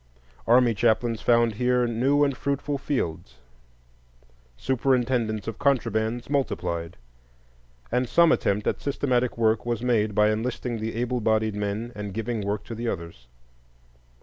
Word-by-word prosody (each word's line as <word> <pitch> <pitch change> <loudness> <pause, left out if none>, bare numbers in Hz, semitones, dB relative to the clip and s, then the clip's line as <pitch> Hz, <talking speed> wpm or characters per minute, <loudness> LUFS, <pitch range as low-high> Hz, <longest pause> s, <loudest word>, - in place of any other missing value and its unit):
Army 120 0 +5
chaplains 115 +1 +1
found 115 -1 +3
here 125 +2 +1
new 130 +5 +2
and 140 -2 +1
fruitful 140 +1 -2
fields; 80 - -3 1.2
"superintendents 125 - 0
of 115 - -5
contrabands" 120 -3 0
multiplied, 85 - -2 0.9
and 125 0 0
some 170 -1 +5
attempt 105 +1 +1
at - - -1
systematic 125 -4 0
work 110 -1 +2
was 120 -1 -2
made 110 -4 +1
by 105 0 +4
enlisting 115 +1 -3
the 110 +1 -4
able 125 +1 -1
bodied 110 0 +1
men 105 +3 -3
and 105 -2 -6
giving 115 0 -2
work 100 +1 -2
to - - -8
the 115 +1 -4
others. 85 - -6
115 Hz, 135 wpm, -25 LUFS, 105-125 Hz, 1.2 s, Army